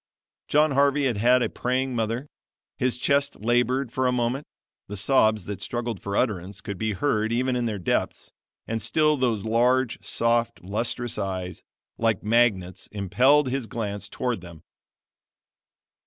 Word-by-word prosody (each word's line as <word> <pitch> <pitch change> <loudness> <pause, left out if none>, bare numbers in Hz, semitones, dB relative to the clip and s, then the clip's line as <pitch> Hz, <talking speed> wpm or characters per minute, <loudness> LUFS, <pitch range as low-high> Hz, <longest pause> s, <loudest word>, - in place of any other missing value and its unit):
John 150 +1 +3
Harvey 140 +1 +3
had 120 -5 0
had 125 +4 +4
a - - 0
praying 130 +1 -1
mother. 115 +3 -1 0.5
His 125 -1 -1
chest 140 +2 +1
labored 120 +2 +1
for 130 +1 0
a - - +2
moment 125 +3 -1 0.4
the 105 - -5
sobs 110 -1 +3
that 100 -1 -6
struggled 120 -4 -4
for 100 0 -3
utterance 100 -4 -1
could 100 -4 -6
be 110 -1 -1
heard 110 -1 0
even 125 +2 +1
in 120 -1 0
their 105 -2 -2
depths 90 - -2 0.4
and 115 0 -2
still 150 -1 +2
those 120 -6 0
large, 120 +2 +2
soft, 115 -1 0
lustrous 115 +4 -2
eyes, 95 -2 -4 0.4
like 115 -3 +1
magnets 105 -5 +1
impelled 130 +8 +3
his 130 -2 -2
glance 105 -3 -4
toward 120 -4 -2
them. 85 -2 -12
120 Hz, 150 wpm, -25 LUFS, 105-130 Hz, 0.5 s, had